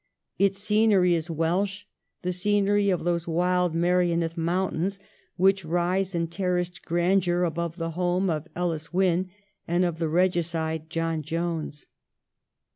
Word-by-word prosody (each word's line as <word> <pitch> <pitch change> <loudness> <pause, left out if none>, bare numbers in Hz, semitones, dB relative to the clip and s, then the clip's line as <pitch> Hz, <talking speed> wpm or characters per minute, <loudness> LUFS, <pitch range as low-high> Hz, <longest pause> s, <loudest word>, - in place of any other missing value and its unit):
Its 195 0 +3
scenery 205 -3 +3
is 165 0 -1
Welsh 185 +5 -1 0.2
— - - -54
the 180 0 -1
scenery 205 +2 +2
of 180 -3 0
those 170 -1 -1
wild 180 0 +1
Merioneth 170 -1 +1
mountains 180 +2 -1 0.4
which 195 +1 +3
rise 175 +3 0
in 170 0 +1
terraced 180 0 -2
grandeur 175 +1 +1
above 170 0 -2
the 165 -2 -3
home 180 +2 0
of 160 -2 -2
Ellis 165 -3 -2
Wynn 185 0 +1 0.4
and 175 +2 +2
of 170 -2 -2
the 165 -2 0
regicide 165 -2 0
John 165 -1 -1
Jones. 160 -1 -3
175 Hz, 135 wpm, -26 LUFS, 165-185 Hz, 0.4 s, Its